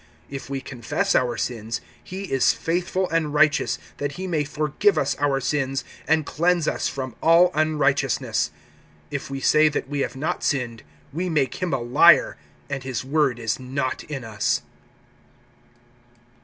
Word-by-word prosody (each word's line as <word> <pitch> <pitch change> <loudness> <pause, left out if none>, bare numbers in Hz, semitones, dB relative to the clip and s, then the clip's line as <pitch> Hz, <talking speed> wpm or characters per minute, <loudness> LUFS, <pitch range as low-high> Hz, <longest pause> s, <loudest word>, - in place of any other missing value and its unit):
(9)If 135 -1 -7
we 135 -1 -3
confess 125 -3 -2
our 120 -2 +1
sins, 115 -2 -3 0.2
he 190 +2 -6
is 135 -9 +2
faithful 180 +2 -1
and 155 -3 0
righteous, 150 - +3 0.2
that 145 0 -3
he 185 - -5
may 165 -5 0
forgive 155 +7 +1
us 140 0 +1
our 140 -2 +2
sins, 135 0 -1 0.2
and 155 -1 +3
cleanse 170 +1 +1
us - - 0
from 130 -3 -5
all 170 +2 +6
unrighteousness. 150 -4 +1 0.6
(10)If 145 -1 -4
we 135 0 -4
say 155 +3 +5
that 145 - -3
we 145 0 -3
have 135 - -2
not 145 +4 -2
sinned, 120 -5 -1 0.3
we 180 +4 -2
make 145 -4 0
him 180 -2 -1
a 135 - +2
liar, 135 +8 +5 0.3
and 135 -1 -4
his 130 -2 -4
word 140 -3 +1
is 115 0 -2
not 130 +1 -3
in 140 -4 -5
us. 110 -2 -1
145 Hz, 155 wpm, -24 LUFS, 130-155 Hz, 0.6 s, all